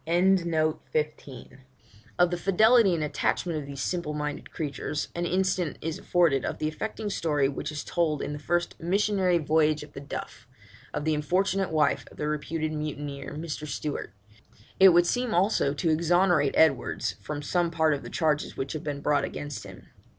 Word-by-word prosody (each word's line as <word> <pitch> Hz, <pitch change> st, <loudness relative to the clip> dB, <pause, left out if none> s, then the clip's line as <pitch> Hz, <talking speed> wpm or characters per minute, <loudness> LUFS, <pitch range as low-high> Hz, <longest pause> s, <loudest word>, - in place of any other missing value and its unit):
' -, -, -33 dB
Of 170 Hz, -3 st, +2 dB
the 140 Hz, -4 st, -5 dB, 0.8 s
fidelity 200 Hz, +2 st, +5 dB
and 160 Hz, -, -1 dB
attachment 155 Hz, +2 st, -1 dB
of 140 Hz, -, -8 dB
these 140 Hz, -1 st, -5 dB
simple 170 Hz, -4 st, -2 dB
minded 150 Hz, -1 st, -4 dB
creatures 150 Hz, -1 st, -4 dB
an 175 Hz, 0 st, -2 dB
instance 185 Hz, -3 st, 0 dB
is 160 Hz, 0 st, -4 dB
afforded 170 Hz, -7 st, +2 dB
in -, -, -2 dB
the 155 Hz, -, -1 dB
affecting 210 Hz, +6 st, -4 dB
story 150 Hz, -7 st, +1 dB
which 140 Hz, +2 st, -4 dB
is 150 Hz, -1 st, -5 dB
told, 155 Hz, -4 st, 0 dB
in -, -, -3 dB
the 145 Hz, -, -6 dB
first 175 Hz, +3 st, -1 dB
Missionary 190 Hz, 0 st, +2 dB
Voyage 155 Hz, -1 st, +2 dB
of 150 Hz, -, -14 dB
the -, -, -7 dB
Duff, 130 Hz, -3 st, -7 dB, 0.4 s
of 150 Hz, 0 st, -3 dB
the 160 Hz, -, +2 dB
unfortunate 185 Hz, +6 st, +1 dB
wife 155 Hz, -2 st, +1 dB
of -, -, -17 dB
the 150 Hz, -, -2 dB
reputed 155 Hz, +1 st, -2 dB
mutineer 145 Hz, -2 st, -5 dB
Mr. 155 Hz, -1 st, -5 dB
Stewart. 145 Hz, -3 st, -4 dB, 0.7 s
It 190 Hz, 0 st, +9 dB
would 175 Hz, 0 st, +5 dB
seem 245 Hz, +4 st, 0 dB
also 185 Hz, -5 st, +2 dB
to 165 Hz, +3 st, 0 dB
exonerate 170 Hz, -2 st, +3 dB
Edwards 150 Hz, -6 st, +2 dB
from 145 Hz, -1 st, -5 dB
some 175 Hz, +3 st, +1 dB
part 160 Hz, -2 st, +2 dB
of 140 Hz, -, -3 dB
the -, -, -8 dB
charges 155 Hz, -2 st, 0 dB
which 135 Hz, +1 st, -3 dB
have 155 Hz, -, -5 dB
been 145 Hz, -1 st, -4 dB
brought 145 Hz, 0 st, +2 dB
against 145 Hz, -1 st, -5 dB
him. -, -, -12 dB
155 Hz, 175 wpm, -27 LUFS, 150-175 Hz, 0.8 s, It